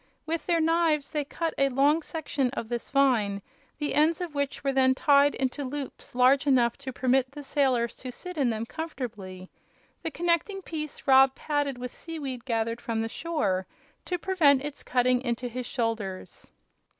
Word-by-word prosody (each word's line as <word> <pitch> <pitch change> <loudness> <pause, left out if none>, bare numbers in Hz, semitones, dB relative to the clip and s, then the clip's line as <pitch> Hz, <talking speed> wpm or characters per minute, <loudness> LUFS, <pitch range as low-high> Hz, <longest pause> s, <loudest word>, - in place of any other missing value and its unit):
With 320 0 -3
their 340 -2 +3
knives 320 -2 +2
they 300 -2 -1
cut 330 +3 -3
a 275 0 +4
long 285 +5 +3
section 295 -5 -2
of 230 -4 -4
this 240 -1 -4
vine, 245 -8 +2 0.4
the 295 -1 -2
ends 310 +2 +3
of 350 -4 -4
which 280 -1 -2
were 275 -1 +1
then 260 -1 +4
tied 285 -1 +4
into 265 +2 -2
loops 275 -1 -6
large 260 +3 +4
enough 245 -4 +4
to 270 -1 -6
permit 260 +1 +1
the 290 +1 -9
sailors 260 -4 +1
to 255 - -7
sit 360 +8 -8
in 275 -5 +2
them 225 0 -2
comfortably. 215 - -6 0.5
The - - -3
connecting 345 +4 0
piece 305 -3 -6
Rob 265 -1 +6
padded 290 -3 -1
with 250 0 -7
seaweed 275 -7 -6
gathered 230 -1 -1
from 225 -2 -2
the 225 - -2
shore, 210 - -1 0.4
to 360 - -1
prevent 310 -7 +3
its 295 -1 -6
cutting 250 0 +2
into 245 0 -2
his 245 +1 -5
shoulders. 225 -6 -4
270 Hz, 175 wpm, -27 LUFS, 245-305 Hz, 0.5 s, Rob